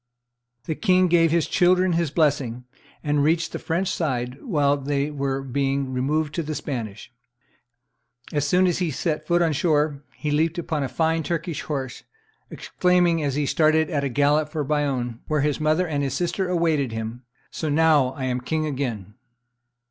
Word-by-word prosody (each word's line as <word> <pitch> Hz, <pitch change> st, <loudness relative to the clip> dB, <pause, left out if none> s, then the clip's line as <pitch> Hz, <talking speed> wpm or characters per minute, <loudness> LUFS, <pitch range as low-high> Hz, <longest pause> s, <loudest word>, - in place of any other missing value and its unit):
The 160 Hz, -, -1 dB
king 185 Hz, +1 st, +3 dB
gave 165 Hz, -1 st, +4 dB
his 165 Hz, 0 st, +2 dB
children 180 Hz, 0 st, +3 dB
his 165 Hz, -2 st, +1 dB
blessing, 140 Hz, -6 st, 0 dB, 0.4 s
and 145 Hz, -2 st, +1 dB
reached 160 Hz, +1 st, +1 dB
the -, -, -5 dB
French 175 Hz, +4 st, -1 dB
side 130 Hz, -6 st, -2 dB
whilst 145 Hz, -, 0 dB
they 145 Hz, +1 st, 0 dB
were 135 Hz, -2 st, -2 dB
being 135 Hz, 0 st, -1 dB
removed 150 Hz, +4 st, 0 dB
to 170 Hz, -, -1 dB
the 155 Hz, -1 st, -4 dB
Spanish; 115 Hz, -7 st, -6 dB, 1.2 s
and -, -, -3 dB
as 145 Hz, 0 st, +1 dB
soon 180 Hz, +5 st, +3 dB
as 180 Hz, -1 st, +1 dB
he 180 Hz, -3 st, 0 dB
set 155 Hz, +2 st, -2 dB
foot 175 Hz, 0 st, +3 dB
on 160 Hz, -2 st, +1 dB
shore, 150 Hz, -2 st, +1 dB
he 150 Hz, -, -3 dB
leaped 160 Hz, +3 st, +1 dB
upon 160 Hz, -3 st, -2 dB
a 135 Hz, -, -2 dB
fine 160 Hz, +5 st, +1 dB
Turkish 165 Hz, -1 st, -3 dB
horse, 135 Hz, -4 st, -4 dB, 0.5 s
exclaiming, 180 Hz, -2 st, +1 dB
as 140 Hz, -3 st, -1 dB
he 150 Hz, 0 st, 0 dB
started 155 Hz, +3 st, +2 dB
at 145 Hz, -3 st, 0 dB
a 140 Hz, -, 0 dB
gallop 145 Hz, +3 st, +2 dB
for 155 Hz, -1 st, -2 dB
Bayonne, 135 Hz, -5 st, -1 dB
where 155 Hz, -2 st, +1 dB
his 145 Hz, 0 st, 0 dB
mother 155 Hz, +4 st, +1 dB
and 145 Hz, -3 st, -1 dB
his 140 Hz, -1 st, -2 dB
sister 180 Hz, +2 st, -1 dB
awaited 160 Hz, -7 st, +1 dB
him, 110 Hz, +2 st, -5 dB, 0.3 s
"So 155 Hz, -, -3 dB
now 150 Hz, -2 st, +4 dB
I 135 Hz, -, -6 dB
am 125 Hz, -1 st, -1 dB
king 155 Hz, +5 st, -1 dB
again!" 125 Hz, -9 st, -4 dB
150 Hz, 180 wpm, -24 LUFS, 135-165 Hz, 1.2 s, gave